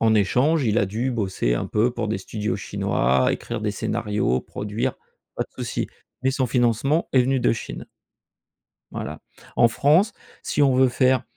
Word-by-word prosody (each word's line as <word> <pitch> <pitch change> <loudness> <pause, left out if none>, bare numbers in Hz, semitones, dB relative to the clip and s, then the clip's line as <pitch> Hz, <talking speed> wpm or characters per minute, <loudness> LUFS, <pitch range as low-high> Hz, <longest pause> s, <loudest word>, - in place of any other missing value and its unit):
En 110 -1 +4
échange, 130 +9 +2
il 110 -1 +2
a 100 - +3
dû 115 +6 -2
bosser 95 - 0
un - - -2
peu 110 +4 +2
pour 115 -3 -3
des 110 - -1
studios 105 +2 -3
chinois, 65 0 +1
écrire 115 -2 -4
des 105 - 0
scénarios, 105 - -1
produire, 110 +5 -3 0.4
pas - - -1
de - - -27
souci. - - -2 0.4
Mais 130 - +3
son 130 -1 0
financement 125 +5 +1
est 130 -2 +5
venu 130 +1 +1
de - - +3
Chine. 115 - -6 1.1
Voilà. - - -5 0.4
En 115 - +6
France 155 - +3 0.3
si 145 - 0
on 135 -2 +4
veut 130 0 +5
faire 130 +1 +2
120 Hz, 175 wpm, -23 LUFS, 105-130 Hz, 1.1 s, En